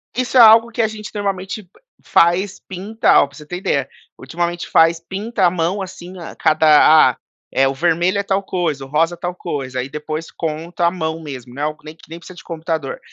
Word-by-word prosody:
Isso 255 +1 0
é - - +8
algo 230 +1 +7
que 230 - -1
a 220 - +2
gente 215 +1 -8
normalmente 200 0 -3
p 175 - -29 0.3
faz, 180 +3 +2
pinta. 200 +4 +1
Ó, - - +1
pra 140 - -19
você 150 - -12
ter 180 +3 -6
ideia, 140 -8 -1 0.3
ultimamente 170 +5 -4
faz 165 +1 +4
pinta 195 +3 -2
a - - +5
mão, 180 +3 -1
assim, 185 0 -9
a 165 - -9
cada 155 -2 +5
ah, - - -17 0.3
é 135 0 +3
o 135 - -1
vermelho 175 +5 +1
é - - -1
tal 195 0 -1
coisa, 165 -8 -2
o - - -12
rosa 165 +4 +1
é - - -26
tal 175 +1 -4
coisa, 135 -7 -5
aí 130 - -4
depois 155 +2 -5
conta, 165 +2 -3
a - - +2
mão 160 -2 -4
mesmo, 130 -5 -9
né, 140 - -7
algo 155 +1 -2
que - - -24
nem 155 +1 -9
que 165 - -20
nem 165 +1 -8
precisa 180 +1 -13
de - - -12
computador. 160 -4 -4
170 Hz, 230 wpm, -19 LUFS, 155-190 Hz, 0.3 s, é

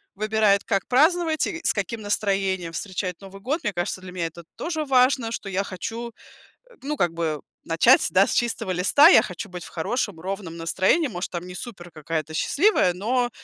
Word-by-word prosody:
выбирает, 215 -1 +2
как 195 -4 -1
праздновать 315 +4 +3
и 340 - -4
с - - +3
каким 215 +3 -3
настроением 195 -4 -1
встречать 185 0 -4
Новый 195 0 -12
год. 295 - -2
Мне 205 - -1
кажется, 175 +2 -2
для 185 -1 -10
меня 175 -2 -2
это 170 +1 -11
тоже 315 -2 -3
важно, 255 -3 +3
что 200 - -5
я 195 +1 -1
хочу, 225 +6 -6 0.6
э, 480 - -19
ну, 300 +2 -2
как 175 - +1
бы 160 -3 -2 0.2
начать, 165 0 +4
да, 190 +1 +5
с - - -2
чистого 225 -4 -1
листа. 190 - +6
Я - - +8
хочу 205 - -7
быть 180 -1 -8
в - - -10
хорошем, 200 +1 -2
ровном 190 -2 -5
настроении. 190 - +1
Может, 180 -2 -5
там 175 0 -5
не 180 - -9
супер 180 -3 -8
какая-то 155 0 -4
счастливая, 290 - +2
но 240 +7 0
195 Hz, 190 wpm, -24 LUFS, 180-240 Hz, 0.6 s, Я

